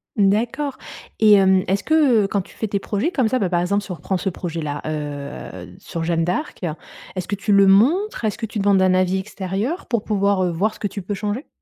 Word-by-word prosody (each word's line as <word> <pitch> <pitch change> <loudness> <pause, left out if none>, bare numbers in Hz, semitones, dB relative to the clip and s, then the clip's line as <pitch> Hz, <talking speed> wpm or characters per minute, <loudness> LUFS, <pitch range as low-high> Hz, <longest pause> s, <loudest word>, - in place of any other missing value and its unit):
D'accord 235 +8 +1 0.4
et 215 -1 +7
hem, 190 -2 +5
est-ce 195 +1 0
que, 315 - +2 0.3
heu, - - -1
quand 200 0 0
tu 185 - -15
fais 220 - -3
tes 205 - -1
projets 205 +8 -1
comme 260 -9 +1
ça, 255 +3 0
bah, 190 - 0
par 175 -1 +1
exemple, 200 +3 0
si - - -12
on - - -3
reprend 190 +3 -2
ce 195 - -2
projet-là, 165 -5 -4
heu, 145 - -6
sur 165 - -5
Jeanne 165 0 +1
d'Arc. 180 - -3 0.5
Est-ce 185 -2 -4
que - - -4
tu 200 +2 -2
le 200 0 +6
montres? 270 - +3
Est-ce 215 -2 -1
que 230 - -3
tu 220 0 -5
demandes 200 -1 +3
un 185 -1 +4
avis 185 0 +2
extérieur 200 - -3
pour 235 -3 -1
pouvoir, 200 -3 +1
heu, 180 - 0
voir 195 +6 0
ce - - -16
que - - -4
tu 200 +1 -6
peux 200 +3 -4
changer? 210 +8 -3
195 Hz, 240 wpm, -21 LUFS, 180-215 Hz, 0.5 s, et